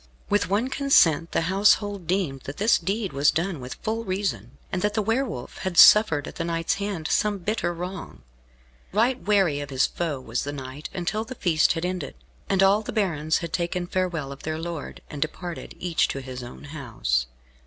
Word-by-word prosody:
With 205 -3 +2
one 215 +6 +1
consent 170 - +4
the - - +1
household 200 +1 +2
deemed 170 -7 -1
that 135 - -6
this 215 +3 +4
deed 200 -2 -2
was 140 +2 +4
done 170 0 -1
with 125 0 -7
full 225 +1 -1
reason, 185 - -3
and 180 - -1
that 210 +1 0
the 215 - +2
Wolf 225 - -2
had 185 -2 -3
suffered 165 -10 +7
at - - -9
the - - -1
knight's 165 0 0
hand 195 -6 -3
some 210 -1 +1
bitter 200 -1 -1
wrong. 180 +2 -7 0.7
Right 240 +6 +2
wary 195 -8 +2
of 145 -1 -6
his 135 -1 +2
foe 160 -6 -3
was 120 -2 -3
the 145 - -4
knight 135 +1 -7
until 190 +5 -2
the 260 +3 -8
feast 165 -7 +3
had 165 +1 -3
ended, 180 -5 -4 0.3
and 195 -1 +3
all 200 +2 +5
the 215 - -6
barons 160 -7 +1
had 165 - -9
taken 175 0 -1
farewell 175 -6 -2
of 140 - -9
their 155 0 -3
lord, 165 -2 -6
and 145 - -8
departed, 170 +3 -4
each 175 -2 +1
to 135 - -4
his 130 -1 -7
own 120 +3 -10
house. 110 - -2
175 Hz, 195 wpm, -25 LUFS, 145-200 Hz, 0.7 s, suffered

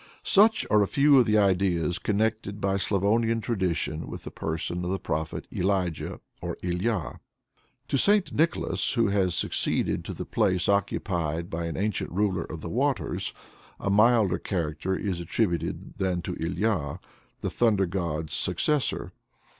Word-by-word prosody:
Such 220 +2 +5
are 105 - +5
a 100 - +2
few 140 +2 +5
of 125 - +3
the 110 0 +3
ideas 90 -4 +2
connected 105 -1 -1
by 100 0 0
Slavonian 110 +4 +1
tradition 90 -8 -2
with - - -7
the - - -7
person 80 +2 -3
of 90 - -2
the 95 - 0
Prophet 80 -3 -3
Elijah 90 -3 -1 0.2
or - - -4
Ilya. 90 +2 -2 0.7
To - - +1
St. 205 +2 +4
Nicholas, 160 +1 +1
who 115 -5 +2
has 95 -3 +1
succeeded - - 0
to - - -5
the - - -5
place 90 -1 +1
occupied 85 -5 -1
by 85 +1 -3
an 85 - -4
ancient 105 0 -1
ruler 95 -2 0
of 80 0 -8
the - - -6
waters, 125 - -1 0.5
a 100 - -1
milder 110 -2 +4
character 85 0 -2
is 95 -4 -2
attributed 85 -1 -2
than 90 -2 0
to 90 - -4
Ilya, 85 -3 -1 0.4
the - - -2
thunder 105 -5 +2
god's 85 -4 -3
successor. 150 -3 0
95 Hz, 150 wpm, -27 LUFS, 85-110 Hz, 0.7 s, Such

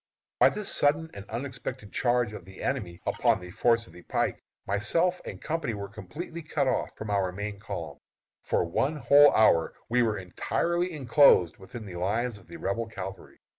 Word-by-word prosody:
By - - +7
this 210 -1 -5
sudden 155 +3 +2
and 100 +1 -10
unexpected 125 -2 -6
charge 120 -3 +1
of 105 - -8
the 95 +2 -11
enemy 100 -11 -2
upon - - +2
the 90 0 -10
force 115 +2 +2
on - - -17
the 90 - -12
pike, - - -1 0.2
myself 165 - +1
and - - -7
company 160 -8 -2
were 100 -1 -6
completely 150 - -7
cut 155 - -1
off - - 0
from 110 -1 -5
our 95 -2 +1
main 100 +2 -5
column. 85 -9 -6 0.4
For - - 0
one 135 - 0
whole 145 +2 +7
hour 85 -7 +4
we 125 +1 +3
were 110 -3 +1
entirely 170 - -1
enclosed 135 - +5
within 110 +4 -9
the 90 -3 -7
lines 105 +5 -1
of - - -20
the 170 - -9
Rebel 115 -4 -2
cavalry. 95 -3 -8
115 Hz, 180 wpm, -28 LUFS, 95-140 Hz, 0.4 s, By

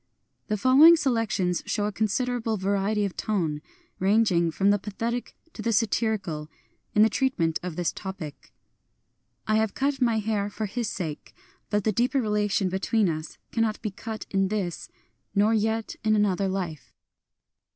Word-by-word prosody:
The 210 - 0
following 275 - +8
selections 225 - 0
show 205 -1 0
a 210 - -1
considerable 225 +2 -1
va 190 +1 -2
riety 200 +1 +1
of 195 - -4
tone, 165 -8 -1 0.2
— - - -38
ranging 200 -6 +3
from 195 +5 +2
the 205 - +2
pathetic 230 +4 -4 0.2
to - - -7
the 230 - 0
satirical, 205 -8 0 0.2
— - - -43
in 210 - +7
the - - +6
treatment 195 - 0
of 180 -3 -5
this 175 0 0
topic: 185 -7 -8 0.9
I 215 0 +2
have 220 -1 0
cut 275 0 0
my 235 -3 +3
hair 210 -1 -1
for 215 +1 -4
his 220 +2 -3
sake; 160 -6 -6 0.4
hut 205 -1 +1
the 215 - +2
deeper 245 +6 +1
relation 210 -3 +1
be 190 +1 -2
tween 215 -1 +2
us 155 0 -5
Cannot 225 -2 0
he 215 - -2
cut 220 +3 -6
in 195 -1 +2
this, 190 -4 -3 0.5
nor 210 +3 +4
yet 220 +1 0
in 215 0 +3
another 200 -2 +2
life. 180 -7 -4
210 Hz, 170 wpm, -26 LUFS, 190-225 Hz, 0.9 s, following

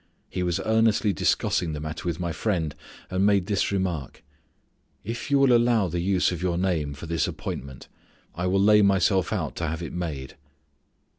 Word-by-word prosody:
He 90 - -3
was 90 -1 0
earnestly 110 -2 +3
discussing 80 0 0
the 75 - -4
matter 80 +3 -5
with 85 -1 -2
my 85 -1 -2
friend, 85 -5 -1 0.4
and 95 +1 +1
made 100 -2 +3
this 100 -1 0
remark: 90 -8 -3 0.8
"If 115 +5 -5
you 140 - +4
will 135 -3 +5
allow 115 -5 +3
the 85 +2 -2
use 90 +1 +2
of 90 -2 -4
your 90 -2 0
name 85 -6 -1
for 75 - -9
this 85 0 0
appointment, 65 0 -6 0.5
I 90 +1 -2
will 95 +1 +2
lay 105 +1 +6
myself 95 -2 +3
out - - -2
to 85 - -2
have 80 +2 -3
it 85 - -6
made." 75 -7 -5
90 Hz, 180 wpm, -25 LUFS, 80-100 Hz, 0.8 s, lay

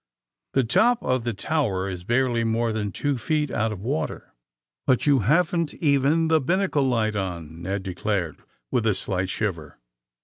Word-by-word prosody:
The 135 - +3
top 240 - +3
of 130 -2 0
the 120 - -1
tower 100 -7 -1
is 90 -2 -5
barely 120 +2 +1
more 115 +1 +1
than 105 -2 -2
two 145 +2 -1
feet 150 +2 0
out 110 -1 0
of 100 -3 -6
water. 140 +7 -3 0.3
' - - -58
^ - - +8
*^But 130 - +1
you 140 -2 +4
haven't 165 - +1
even 145 +2 +2
the 160 -1 +3
binnacle 170 -2 +1
light 110 -4 +1
on,'* 85 -4 -4
Ned 95 +2 -3
declared, 95 -2 -2 0.3
with 120 -3 +1
a 105 - +3
slight 95 -1 -2
shiver. 85 -9 -3
115 Hz, 175 wpm, -24 LUFS, 95-145 Hz, 0.3 s, ^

